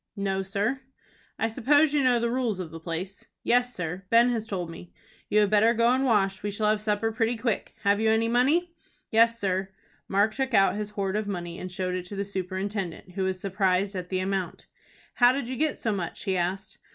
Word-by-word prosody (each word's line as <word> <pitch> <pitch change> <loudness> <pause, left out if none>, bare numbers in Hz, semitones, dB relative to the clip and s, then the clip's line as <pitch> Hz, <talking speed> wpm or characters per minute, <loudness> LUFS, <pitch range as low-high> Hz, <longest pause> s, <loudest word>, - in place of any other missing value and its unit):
"No, 195 -1 -1
sir." 205 +7 -1 0.6
"I 225 - +1
suppose 285 +6 +3
you 290 -2 +2
know 250 -2 +4
the 235 0 0
rules 240 -6 -1
of 170 -4 -5
the 165 - -8
place." 170 +4 -5 0.2
"Yes, 245 0 +2
sir; 180 +2 -4
Ben 235 +2 +5
has 225 -2 -2
told 180 -5 -3
me." 170 +1 -11 0.4
"You 210 0 +4
had 205 -1 +2
better 220 +3 +4
go 230 +1 +3
and 260 +2 +2
wash. 195 -6 +2
We 205 - -2
shall 210 +1 +1
have 215 -1 0
supper 215 +1 0
pretty 225 +1 0
quick. 225 -1 -2
Have 200 0 +3
you 220 0 +2
any 220 +1 +2
money?" 290 +9 +2 0.4
"Yes, 230 0 +4
sir." 190 -1 -1 0.4
Mark 205 +3 +2
took 265 -2 -1
out 195 0 +4
his 210 0 -3
hoard 200 -2 -2
of 215 -1 -1
money, 175 -3 -5
and 185 - -6
showed 185 0 -2
it 180 -1 -3
to 200 - -7
the 200 0 -2
superintendent, 190 -1 -4
who 190 +1 -2
was 190 -1 -2
surprised 195 0 0
at 180 -1 -5
the 185 - -1
amount. 190 -1 -3 0.5
"How 245 0 +5
did 270 -3 -3
you 260 - -4
get 305 +2 0
so 225 - -1
much?" 185 -5 -4
he 190 - 0
asked. 185 +3 -3
205 Hz, 220 wpm, -27 LUFS, 190-230 Hz, 0.6 s, Ben